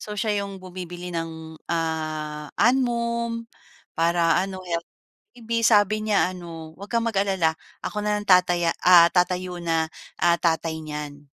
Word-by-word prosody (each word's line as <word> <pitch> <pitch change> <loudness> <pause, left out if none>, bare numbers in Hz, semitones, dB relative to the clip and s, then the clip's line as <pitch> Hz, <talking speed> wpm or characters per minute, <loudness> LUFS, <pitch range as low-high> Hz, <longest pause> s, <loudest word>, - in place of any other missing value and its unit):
So, 210 0 -7
siya 205 -2 0
‘yong 195 -1 -8
bumibili 180 -1 -7
ng, 160 -1 -5
ah, 155 -2 -3
Anmum, 235 -2 +1 0.5
para 170 0 +3
ano 190 -1 -6
healthy 170 -1 -3 0.4
si - - -16
baby. 230 +1 0
Sabi 215 -1 +4
niya 200 -3 +2
ano, 165 -2 -9
'wag 200 +4 -10
ka 235 - +3
mag-alala, 195 -7 +1 0.3
ako 210 0 -3
na 210 0 +1
lang 205 - -10
tataya 180 -2 +4 0.2
ah, 175 -2 +8
tatayo 180 0 0
na, 165 -1 +1 0.3
ah, 170 0 +4
tatay 165 -1 0
niyan. 150 -1 -7
180 Hz, 150 wpm, -24 LUFS, 165-210 Hz, 0.5 s, ah